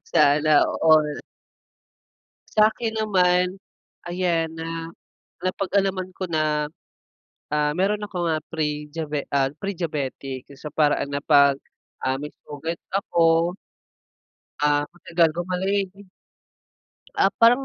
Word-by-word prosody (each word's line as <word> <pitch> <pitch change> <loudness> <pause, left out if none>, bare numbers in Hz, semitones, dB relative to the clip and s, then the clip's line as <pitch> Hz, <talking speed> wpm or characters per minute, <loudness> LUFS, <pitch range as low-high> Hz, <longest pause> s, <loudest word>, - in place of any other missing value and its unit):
Sana 150 0 +4 0.2
all. 155 -2 +4 1.4
Sa'kin 220 +2 +3
naman, 180 -2 +2 0.5
ayan, 175 -3 0
na 165 0 -5 0.5
napag-alaman 190 0 -1
ko 185 0 -5
na, 155 -2 0 0.8
ah, 150 0 +1
meron 200 +4 +1
akong, 175 -4 -2
ah, 160 - +1 0.2
prediabe 150 -1 -3
ah, 135 -1 +3
prediabetic, 150 -8 -4
sa 145 +3 -8
paraan 145 -1 +1
na 140 - -2
'pag, 140 -1 +5 0.5
ah, 130 +1 0
may 150 - -5 0.2
sugat 160 +3 -5 0.2
ako 170 -2 +2 1.0
ah, 145 0 +3
matagal 170 -1 +2
gumaling. 190 +3 0 1.3
Ah, 195 - +3
parang 245 +4 +6
165 Hz, 100 wpm, -24 LUFS, 150-185 Hz, 1.4 s, parang